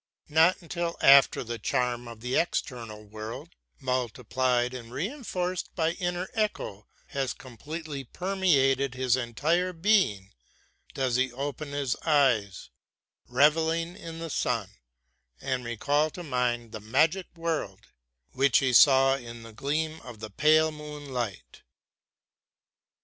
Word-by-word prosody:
Not 165 +5 +4
until 170 0 -3
after 140 -1 +7
the 120 -1 -5
charm 125 -1 -1
of 115 -2 -10
the 125 +2 -2
external 115 -10 -2
world, 110 +2 -8 0.3
multiplied 125 0 0
and 120 -2 -8
reinforced 185 - -3
by 160 -2 +1
an 170 - -4
inner 180 0 -2
echo, 210 - -2 0.2
has 135 -2 -2
completely 145 +4 -7
permeated 140 -7 +1
his 130 -1 +2
entire 155 +9 0
being, 165 - +2 0.6
does 130 -2 +1
he 130 0 +1
open 145 +4 -4
his 140 -3 -1
eyes, 130 - +1 0.6
reveling 160 +6 +2
in 165 -1 -8
the 165 -1 -6
sun, - - -1 0.7
and 130 - -2
recall 145 +6 +1
to 175 +3 -9
mind 125 -5 -1
the 110 - -6
magic 155 - +1
world 160 - -3 0.5
which 135 -1 +3
he 130 -2 +1
saw 135 +1 +7
in 120 -2 -10
the 115 -1 -11
gleam 155 +6 -2
of 120 -4 -11
the 110 -1 -7
pale 155 +6 +4
moonlight. 145 -8 -6
135 Hz, 125 wpm, -28 LUFS, 120-160 Hz, 0.7 s, after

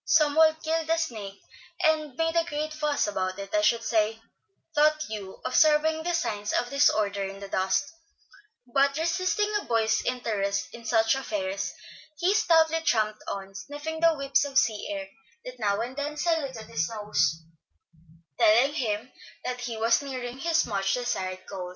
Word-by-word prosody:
"Some 300 -2 +4
one 315 0 +5
killed 320 0 -1
the 330 +1 +2
snake 215 -11 -4 0.4
and 310 -4 +2
made 325 +2 0
a 335 - +4
great 305 -1 -4
fuss 300 -1 0
about 185 -2 -2
it, 200 0 -8
I 315 - +3
should 235 -7 +2
say," 220 -1 +1 0.5
thought 305 0 +4
Hugh, 205 -3 -7
observing 310 +3 +3
the 350 +2 -2
signs 210 -10 -2
of 245 - 0
disorder 210 -8 +2
in 195 0 -6
the 200 - -7
dust; 190 +6 +1 0.9
but, 275 +1 +3
resisting 370 +6 0
a - - -10
boy's 220 -2 +1
interest 205 -5 -1
in 235 0 -11
such 225 0 +3
affairs, 285 +2 -3 0.5
he 360 +5 +2
stoutly 325 -4 +3
tramped 215 -8 +1
on, 195 0 -5
sniffing 295 +8 -6
the 330 0 +4
whiffs 275 -1 +1
of 280 -1 -2
sea 215 -4 +2
air 295 -1 -4 0.4
that 250 0 -9
now 205 -2 +1
and 245 +3 -5
then 290 +1 -4
saluted 290 -8 -1
his 160 +2 -2
nose, 210 -7 0 1.0
telling 240 +7 +5
him 235 -4 -2 0.3
that 250 0 -3
he 240 -2 -4
was 230 +5 +3
nearing 255 -2 -6
his 330 +2 +2
much 195 -3 0
desired 185 -7 -3
goal. 185 -3 -6
255 Hz, 165 wpm, -27 LUFS, 210-310 Hz, 1.0 s, one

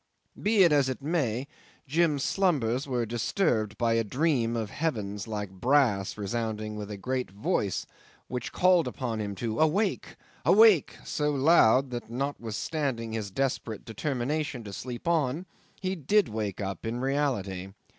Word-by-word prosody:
'Be 210 -1 +4
it 170 - +5
as 140 -3 +3
it 130 - -3
may, 140 -6 0 0.4
Jim's 150 -1 +2
slumbers 140 - +1
were 125 -3 0
disturbed 115 - 0
by 115 +2 +2
a 115 0 +2
dream 125 0 +1
of 110 -3 -3
heavens 105 -11 -2
like 105 -3 -4
brass 105 -2 +2
resounding 110 0 -3
with 105 -1 -6
a 105 - -5
great 125 +5 -2
voice, 100 -1 -1 0.4
which 125 -2 -4
called 180 -2 +4
upon 115 -4 -3
him 100 -1 -4
to 115 +2 -3
Awake! 185 +6 +1 0.3
Awake! 215 -5 +5
so 150 0 0
loud 135 -3 +4
that, 120 -2 -5
notwithstanding 120 0 -3
his 110 -3 -3
desperate 120 -1 -2
determination 135 +3 -2
to 100 -2 -8
sleep 125 - -6
on, 160 0 +1 0.3
he 190 0 -2
did 190 - +2
wake 105 -3 -3
up 95 -3 -4
in 115 +2 -3
reality. 125 -9 -1
125 Hz, 145 wpm, -28 LUFS, 110-150 Hz, 0.4 s, it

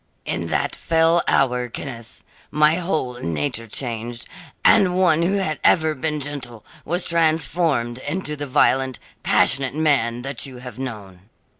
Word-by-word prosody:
"In - - -2
that - - -1
fell 165 +1 +2
hour, 125 -2 +2
Kenneth, 115 -2 -8 0.3
my 150 +2 +3
whole 155 -9 -2
nature 85 +8 -2
changed, 120 0 -3 0.4
and 180 -2 +5
one 175 -4 +4
who 175 +3 +1
had 170 -6 -1
ever 160 -2 +4
been 150 +2 -2
gentle 130 -6 -6 0.2
was 175 +3 -2
transformed 160 -6 +1
into 150 +2 -3
the 145 0 -5
violent, 130 0 +2 0.2
passionate 135 -1 +2
man 130 -6 +1
that 135 +2 -3
you 130 -2 -10
have 125 -1 -10
known. 100 -6 -8
135 Hz, 140 wpm, -21 LUFS, 120-160 Hz, 0.4 s, and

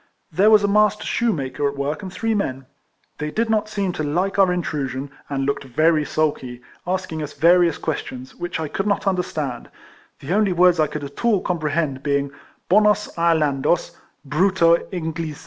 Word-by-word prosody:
There 190 +7 +4
was 215 -1 +6
a - - +3
master 210 +1 +3
shoe 235 0 +1
maker 140 -3 -2
at 140 - -9
work 145 +5 -2
and 190 -2 -7
three 225 +4 -1
men. 135 -11 -2 0.5
They 150 +1 -2
did 225 +7 -1
not 215 -1 +1
seem 200 -4 -2
to 155 - -3
hke 180 +7 -1
our 190 -2 +5
intrusion, 140 -6 -3 0.2
and 135 -1 -1
looked 140 +1 -1
RIFLEMAN 155 +6 +2
HARRIS. 155 -1 -2
101 145 -5 0
very - - -8
sulky, - - -25 0.3
asking 185 -4 -2
us 150 - -6
various 170 +2 +4
questions, 130 -4 -5
which 175 -1 -5
I 160 - -2
could 195 +7 -3
not 200 -1 0
understand; 155 -9 -2 0.5
the 145 +5 -3
only 205 -2 +2
words 180 -1 +4
I 155 - +3
could 150 0 -6
at 140 +7 -8
all 230 -4 +3
comprehend 155 -5 -1
being 140 -1 0 0.2
" - - -38
Bonos 210 +1 +3
Irelandos, 160 -2 +1 0.3
Brutu 170 +2 +3
Englisa." 160 -3 -4
165 Hz, 190 wpm, -21 LUFS, 145-195 Hz, 0.5 s, was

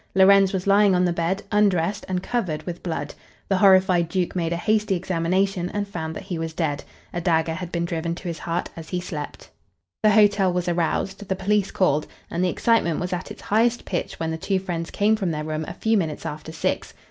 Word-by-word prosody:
Lorenz 195 0 +6
was 190 -2 -2
lying 200 -1 +5
on 180 0 +3
the 175 - +1
bed, 170 +4 -1
undressed 200 -3 +2
and 180 -1 -1
covered 185 -11 -2
with 175 -1 -6
blood. 150 -4 -4 0.4
The 195 - +3
horrified 185 -3 +5
duke 180 +1 -1
made 170 -2 -1
a - - +1
hasty 210 +1 +1
examination 185 +1 0
and 205 +1 -3
found 160 -4 -5
that - - -6
he 175 -3 -4
was 160 0 -3
dead. 150 -4 -2 0.3
A 175 - -2
dagger 160 -1 +1
had 175 +1 -6
been 170 -1 -1
driven 170 0 -2
to 175 - -8
his 170 -2 -4
heart 170 +1 -2
as 160 -1 -9
he 180 - -1
slept. 155 -5 -7 0.5
The 215 - +5
hotel 205 -3 +4
was 180 0 -1
aroused, 180 +4 -1
the 190 - +1
police 200 +1 +1
called, 150 -5 +1 0.2
and 170 +2 0
the 185 - +2
excitement 200 -6 +2
was 180 +1 -3
at 180 +1 -4
its - - -10
highest 230 +3 +1
pitch 180 - -3
when 160 0 -1
the 160 - -3
two 195 +4 0
friends 175 -3 -4
came 210 +2 +2
from 195 -5 -1
their 150 -2 -2
room 155 0 -3
a - - -5
few 225 +2 +1
minutes 155 -5 -3
after 155 +1 -6
six. 160 - -2
180 Hz, 220 wpm, -24 LUFS, 165-195 Hz, 0.5 s, Lorenz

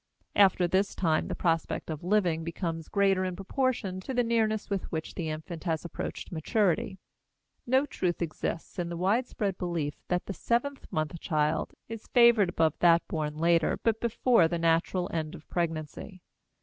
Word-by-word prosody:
After 190 -3 +5
this 190 +3 +1
time, 160 -4 +1
the - - -3
prospect 165 -1 -1
of 155 0 -6
living 180 -4 +1
becomes 165 -1 -4
greater 195 -2 +2
in 185 -1 -2
proportion 195 -1 -1
to 255 +7 -5
the 245 - +3
nearness 220 -2 +1
with 200 -2 -3
which 160 -1 -4
the 165 -3 -3
infant 160 +2 -6
has 165 -1 -1
approached 170 - -6
maturity. 190 +2 0 0.7
No 260 +3 +3
truth 180 -10 -2
exists 170 +2 -4
in 175 -1 -2
the 170 - -4
widespread 200 0 0
belief 170 -5 -2
that 180 0 -1
the 195 - -4
seventh 255 +7 -1
month 155 +1 -2
child 155 0 0
is 225 -1 -8
favored 235 -5 +5
above 160 -3 +2
that 170 -1 +4
born 150 -2 -3
later 165 0 +3
but 225 -1 +1
before 235 -5 +3
the 170 +1 -2
natural 165 +2 +1
end 155 -2 -2
of 155 - -14
pregnancy. 170 +2 -3
175 Hz, 165 wpm, -29 LUFS, 165-205 Hz, 0.7 s, After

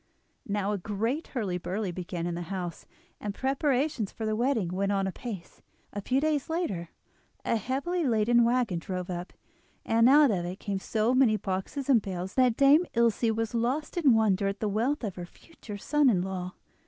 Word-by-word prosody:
Now 205 -1 -1
a 205 - -1
great 225 - -2
hurly 200 -8 -2
burly 190 +2 -3
began 175 -1 -5
in 175 - -2
the 170 - -4
house, 180 -4 -5 0.3
and 205 -1 -4
preparations 270 -4 0
for 225 - -5
the 215 0 0
wedding 235 -6 +1
went 195 +3 -1
on 195 -1 +1
apace. 190 -1 -7 0.3
A 205 - -4
few 255 +6 +1
days 300 -1 0
later 205 - -2 0.6
a - - +1
heavily 275 - -1
laden 235 -2 +3
waggon 235 -6 +1
drove 180 +1 -5
up, 175 +1 -5 0.5
and 230 +2 +4
out 290 -2 +6
of 180 -4 -1
it 180 +3 -5
came 200 -2 -3
so 220 +4 0
many 255 -5 +4
boxes 195 +8 -4
and 255 -5 +5
bales 185 -1 -5
that 250 -3 +3
Dame 290 +5 +5
Ilse 235 -2 +2
was 225 0 -1
lost 250 +6 -1
in 295 -9 +4
wonder 205 -3 +2
at 195 +1 -3
the 215 - -1
wealth 240 +8 0
of 200 -4 -4
her 175 - -5
future 215 - -11
son 295 +6 +3
in 185 -6 +2
law. 185 -1 -5
215 Hz, 190 wpm, -28 LUFS, 190-260 Hz, 0.6 s, out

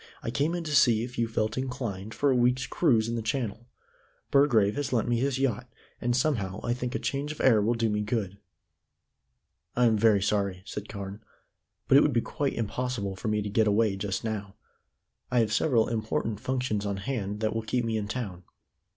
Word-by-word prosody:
I 115 - -2
came 145 +7 0
in 175 - -3
to 155 -2 -2
see 115 -5 +5
if 125 0 -6
you 115 - +2
felt 110 +1 -1
inclined 115 -6 -4
for 145 -1 +2
a - - +3
week's 125 +1 +2
cruise 115 -10 +2
in 115 - -2
the 115 - -1
Channel. 115 0 -3 0.6
Burgrave 115 -8 +4
has 145 -1 -2
lent 115 -4 +1
me 120 -1 +1
his 135 +1 0
yacht, 125 -2 -1 0.3
and 120 0 +1
somehow 110 -8 0
I 120 - 0
think 125 +1 -4
a - - +2
change 140 +2 -2
of 155 - -8
air 115 -5 +5
will 115 +4 +1
do 115 0 +1
me 105 -1 0
good." 105 -3 -2 1.4
"I 125 - +4
am 110 -2 +3
very 105 -3 +4
sorry," 100 -3 0
said 105 0 -6
Carne, 100 0 -7 0.7
"but 135 - +7
it - - +8
would 150 - +2
be 120 - +3
quite 140 +3 -2
impossible 115 -3 -2
for 95 - -6
me 105 -1 +1
to 105 - -4
get 110 +1 +3
away 105 -1 +3
just 100 0 -3
now. 105 -3 -4 0.7
I 125 - 0
have 110 -1 0
several 115 -3 +3
important 110 -1 -2
functions 125 -5 -1
on 100 -1 -2
hand 105 -1 -3
that 110 -1 0
will 115 - -1
keep 120 +2 -1
me 115 -1 -1
in 105 -2 -2
town." 105 -6 -4
115 Hz, 210 wpm, -28 LUFS, 105-125 Hz, 1.4 s, it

